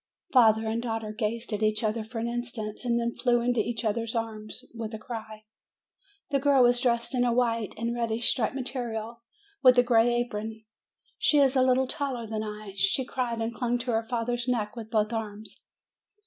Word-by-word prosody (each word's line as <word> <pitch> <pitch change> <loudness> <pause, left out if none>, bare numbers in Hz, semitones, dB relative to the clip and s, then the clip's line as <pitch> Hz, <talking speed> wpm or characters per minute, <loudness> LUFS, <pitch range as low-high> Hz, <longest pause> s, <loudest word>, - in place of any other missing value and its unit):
Father 225 -3 +5
and 225 +1 -1
daughter 225 -2 -3
gazed 225 +1 -3
at 210 - -2
each 215 +1 +1
other 220 +1 0
for 225 +2 -9
an 230 +1 -1
instant; 235 -3 -4
then 235 -1 +1
flew 240 -2 +2
into 240 0 +1
each 225 +1 -1
other's 225 +2 -1
arms, 220 -2 -4
with 225 -1 -5
a - - -4
cry. 215 -1 -8 0.9
The 280 - +2
girl 275 -2 +5
was 245 0 +4
dressed 235 0 +1
in 250 -1 +2
a 245 - +2
white 230 -3 0
and 230 +1 -1
reddish 230 -1 +1
striped 240 0 -1
material, 235 -3 -4 0.4
with 255 -2 +7
a 245 - +7
gray 240 -1 +4
apron. 220 -2 -3 0.5
She 300 - +4
is 275 -2 +4
a 260 - +4
little 255 0 +3
taller 265 -4 -3
than 220 0 -3
I. 210 -2 -7
She 195 +7 +1
cried, 245 -3 -2
and 225 +1 -2
clung 245 0 0
to 245 +1 -3
her 225 0 0
father's 240 0 -1
neck 220 -4 -1
with 225 -2 -7
both 215 0 +1
arms. 215 -1 -6
230 Hz, 190 wpm, -28 LUFS, 220-245 Hz, 0.9 s, with